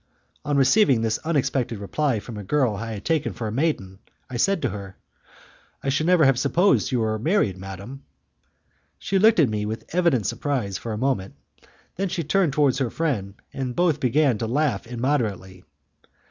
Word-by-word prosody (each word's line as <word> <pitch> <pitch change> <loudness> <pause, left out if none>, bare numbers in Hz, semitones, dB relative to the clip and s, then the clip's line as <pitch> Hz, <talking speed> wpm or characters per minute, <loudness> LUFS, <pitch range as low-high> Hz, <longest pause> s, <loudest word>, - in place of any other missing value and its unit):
On 145 -1 0
receiving 135 - +4
this 110 -1 0
unexpected 135 -7 -1
reply 120 +5 -1
from 115 +2 -9
a 105 - -6
girl 125 +1 +1
I 115 +2 -5
had 105 - -8
taken 160 -3 0
for 120 - -6
a 110 - -2
maiden, 110 - -1 0.3
I 125 - -3
said 195 +9 +2
to - - +1
her, 95 -1 -8 0.9
"I 135 - 0
should 145 +4 0
never 175 -4 +5
have 135 -2 +3
supposed 175 +8 +3
that - - -5
you 120 - +1
were 110 -1 -1
married, 155 - +1
madam." 95 +8 -9 1.0
She 195 - 0
looked 220 -1 +5
at 145 -7 +5
me 105 -1 -2
with 110 +1 -5
evident 170 - +2
surprise 120 -10 -2
for 115 - -6
a 105 - -3
moment, 120 -6 -1 0.6
then 195 +1 -1
she 170 - -2
turned 165 0 +1
towards 140 -2 +2
her 130 -3 0
friend, 110 -11 -2 0.2
and 130 -2 -4
both 170 -4 +2
began 130 -2 +2
to 115 - -2
laugh 145 +1 0
immoderately. 115 -7 -2
130 Hz, 185 wpm, -24 LUFS, 110-155 Hz, 1.0 s, never